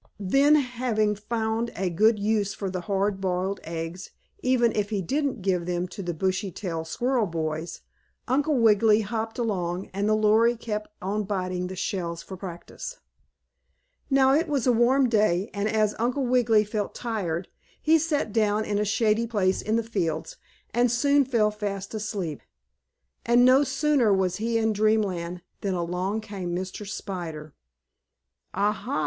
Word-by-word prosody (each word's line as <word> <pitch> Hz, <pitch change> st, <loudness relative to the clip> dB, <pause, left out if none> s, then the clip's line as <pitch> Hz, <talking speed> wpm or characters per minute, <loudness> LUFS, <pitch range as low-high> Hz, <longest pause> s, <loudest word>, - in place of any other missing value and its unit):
Then, 275 Hz, +10 st, +4 dB
having 245 Hz, -6 st, +1 dB
found 220 Hz, +2 st, -2 dB
a 185 Hz, -1 st, -1 dB
good 215 Hz, +6 st, +4 dB
use 205 Hz, -1 st, 0 dB
for 195 Hz, -2 st, -4 dB
the 185 Hz, -1 st, -3 dB
hard 195 Hz, 0 st, -1 dB
boiled 190 Hz, +1 st, -1 dB
eggs, 165 Hz, +2 st, -5 dB, 0.3 s
even 250 Hz, -4 st, +3 dB
if 205 Hz, -1 st, 0 dB
he 210 Hz, -3 st, -1 dB
didn't 270 Hz, -, -1 dB
give 180 Hz, -3 st, 0 dB
them 175 Hz, 0 st, -1 dB
to 200 Hz, -, -7 dB
the 175 Hz, -3 st, -3 dB
Bushytail 185 Hz, -2 st, -2 dB
squirrel 240 Hz, +5 st, 0 dB
boys, 160 Hz, 0 st, -4 dB, 0.5 s
Uncle 285 Hz, +3 st, +2 dB
Wiggily 220 Hz, -1 st, +5 dB
hopped 225 Hz, +2 st, -3 dB
along, 185 Hz, -6 st, -2 dB
and 200 Hz, +2 st, 0 dB
the 215 Hz, -, +4 dB
Lory 220 Hz, +2 st, +4 dB
kept 215 Hz, -2 st, -4 dB
on 205 Hz, +2 st, -1 dB
biting 185 Hz, -2 st, -2 dB
the 185 Hz, -, -6 dB
shells 170 Hz, -2 st, -3 dB
for 190 Hz, -, -8 dB
practice. 190 Hz, -, -8 dB, 1.1 s
Now, 270 Hz, -1 st, +4 dB
it 325 Hz, +4 st, +2 dB
was 280 Hz, -6 st, 0 dB
a 250 Hz, -, +5 dB
warm 250 Hz, +3 st, +4 dB
day, 210 Hz, -3 st, +2 dB
and, 200 Hz, +1 st, -1 dB
as 215 Hz, -1 st, +2 dB
Uncle 250 Hz, +4 st, 0 dB
Wiggily 240 Hz, -4 st, +3 dB
felt 210 Hz, -1 st, -3 dB
tired, 190 Hz, -7 st, -3 dB, 0.3 s
he 320 Hz, +1 st, +4 dB
sat 295 Hz, -9 st, -1 dB
down 215 Hz, -1 st, +2 dB
in 205 Hz, -1 st, -1 dB
a -, -, +2 dB
shady 215 Hz, +2 st, +1 dB
place 195 Hz, -4 st, +1 dB
in 215 Hz, -, 0 dB
the 230 Hz, -, +1 dB
fields, 170 Hz, -8 st, -2 dB, 0.4 s
and 240 Hz, +1 st, +3 dB
soon 280 Hz, +3 st, +3 dB
fell 225 Hz, -5 st, +2 dB
fast 200 Hz, -2 st, -5 dB
asleep. 200 Hz, -8 st, -4 dB, 0.8 s
And, 240 Hz, +1 st, +5 dB
no 260 Hz, +3 st, +6 dB
sooner 275 Hz, -4 st, +2 dB
was 190 Hz, -2 st, +1 dB
he 230 Hz, +1 st, 0 dB
in 220 Hz, -1 st, +1 dB
Dreamland 195 Hz, -5 st, 0 dB, 0.2 s
than 195 Hz, -2 st, -2 dB
along 180 Hz, +5 st, -2 dB
came 195 Hz, -5 st, -5 dB
Mr. 185 Hz, +3 st, -5 dB
Spider. 165 Hz, -7 st, -6 dB, 1.0 s
"Ah, 205 Hz, +1 st, +2 dB
ha!" 215 Hz, -, -3 dB
210 Hz, 160 wpm, -26 LUFS, 185-235 Hz, 1.1 s, no